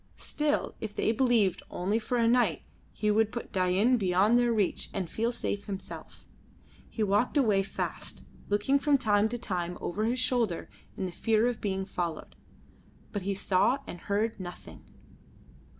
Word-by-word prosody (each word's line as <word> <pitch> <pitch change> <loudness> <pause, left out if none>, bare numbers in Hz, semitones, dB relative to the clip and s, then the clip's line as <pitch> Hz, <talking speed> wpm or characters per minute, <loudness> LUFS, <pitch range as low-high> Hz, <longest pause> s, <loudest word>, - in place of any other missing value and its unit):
Still, 300 0 -1
if 215 -2 -5
they - - +2
believed 230 -6 +2
only 200 +5 0
for 245 +2 -2
a 230 -1 +3
night, 230 - +2 0.3
he 210 -1 0
would 220 0 +2
put 235 - -6
Dain 190 +7 +3
beyond 195 +2 +3
their 240 -1 +3
reach 210 -4 0
and 190 -3 -1
feel 230 +7 -1
safe 205 -4 -3
himself. 195 -1 -8 0.6
He 220 - -2
walked 210 +8 +2
away 215 -8 +4
fast, 195 - -5 0.2
looking 210 +7 +2
from 290 0 +3
time 215 -4 +2
to 240 - -3
time 180 -6 -3
over 210 +5 -2
his 245 +3 0
shoulder 230 -8 0 0.3
in - - -2
the 180 - -4
fear 220 +4 +2
of 245 -2 -1
being 195 -2 -1
followed, 175 -4 -4 0.8
but 205 - -3
he 195 +1 -2
saw 195 +7 +2
and 175 - -8
heard 210 +4 -1
nothing. 180 -1 -9
210 Hz, 165 wpm, -29 LUFS, 190-235 Hz, 0.8 s, away